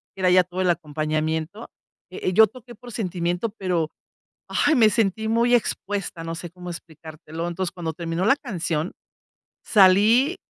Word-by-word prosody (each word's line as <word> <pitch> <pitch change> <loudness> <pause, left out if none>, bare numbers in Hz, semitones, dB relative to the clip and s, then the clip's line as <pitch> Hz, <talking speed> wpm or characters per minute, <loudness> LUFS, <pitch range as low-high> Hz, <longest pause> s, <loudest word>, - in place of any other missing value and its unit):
era 185 -1 +2
ya 180 0 +6
todo 180 +1 -4
el 185 - +2
acompañamiento. 155 +4 -2 0.4
Eh, 180 - -9
eh, 185 - 0
yo 220 +4 +7
toqué 245 +2 -13
por 240 +3 -12
sentimiento, 180 0 -2
pero, 180 -6 -2 0.6
¡ay, 310 - +2
me 225 -5 +6
sentí 220 -1 0
muy 235 +2 +2
expuesta!, 200 -6 -2
no 165 0 -4
sé 170 0 -7
cómo 180 0 -9
explicártelo. 160 0 -8
Entonces, 175 +1 -3
cuando 170 -3 -4
terminó 170 +2 -3
la 230 - +5
canción, 170 - -3 0.7
salí, 215 - +5
180 Hz, 155 wpm, -23 LUFS, 165-215 Hz, 0.7 s, yo